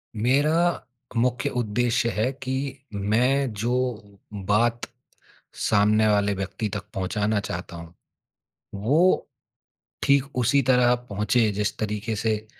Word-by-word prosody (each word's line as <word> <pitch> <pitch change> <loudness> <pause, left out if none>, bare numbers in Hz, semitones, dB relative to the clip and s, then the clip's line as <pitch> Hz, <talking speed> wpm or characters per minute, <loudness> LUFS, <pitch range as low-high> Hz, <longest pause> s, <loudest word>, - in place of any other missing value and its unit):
मेरा 150 +9 +2 0.3
मुख्य 125 +1 +1
उद्देश्य 120 +1 0
है 115 +5 0
कि 130 +1 -3 0.2
मैं 125 +7 +1
जो 115 +4 -2 0.6
बात 105 +4 0 0.8
सामने 105 +1 +3
वाले 105 -1 +2
व्यक्ति 100 +3 -4
तक - - -5
पहुँचाना 105 +2 0
चाहता 85 -3 -6
हूँ, 85 0 -11 0.8
वो 145 - +2 0.8
ठीक 140 0 +2
उसी 130 +3 +3
तरह 125 -1 +5
पहुँचे, 110 -1 0
जिस 105 +1 -2
तरीके 105 +1 -3
से 110 0 -1
110 Hz, 110 wpm, -24 LUFS, 105-125 Hz, 0.8 s, तरह